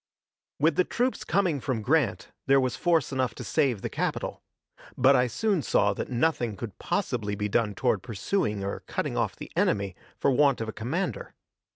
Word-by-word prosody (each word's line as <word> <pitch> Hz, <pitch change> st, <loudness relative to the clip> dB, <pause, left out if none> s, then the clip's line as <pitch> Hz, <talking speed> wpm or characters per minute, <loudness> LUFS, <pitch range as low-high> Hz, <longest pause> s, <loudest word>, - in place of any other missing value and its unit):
With 155 Hz, +1 st, +3 dB
the 180 Hz, -, +5 dB
troops 250 Hz, +7 st, -1 dB
coming 175 Hz, -5 st, +1 dB
from 125 Hz, -4 st, -2 dB
Grant, 150 Hz, +1 st, +1 dB, 0.2 s
there 135 Hz, 0 st, +6 dB
was 130 Hz, -2 st, 0 dB
force 165 Hz, -6 st, +1 dB
enough 130 Hz, -4 st, -1 dB
to -, -, -7 dB
save 130 Hz, -10 st, +1 dB
the -, -, 0 dB
capital; -, -, -3 dB, 0.6 s
but 130 Hz, +2 st, +6 dB
I 125 Hz, 0 st, +3 dB
soon 205 Hz, -, 0 dB
saw 100 Hz, -6 st, +2 dB
that -, -, -5 dB
nothing 120 Hz, -3 st, 0 dB
could 105 Hz, +1 st, -7 dB
possibly 125 Hz, -, -1 dB
be 105 Hz, +1 st, -2 dB
done 105 Hz, -1 st, +1 dB
toward 125 Hz, -, +1 dB
pursuing 110 Hz, -, -1 dB
or 100 Hz, -, -3 dB
cutting -, -, -2 dB
off -, -, 0 dB
the -, -, -9 dB
enemy 100 Hz, -2 st, +1 dB, 0.2 s
for 140 Hz, -, +2 dB
want 140 Hz, 0 st, +4 dB
of 115 Hz, -, -3 dB
a 110 Hz, -, -5 dB
commander. 145 Hz, -, -3 dB
130 Hz, 185 wpm, -27 LUFS, 110-160 Hz, 0.6 s, there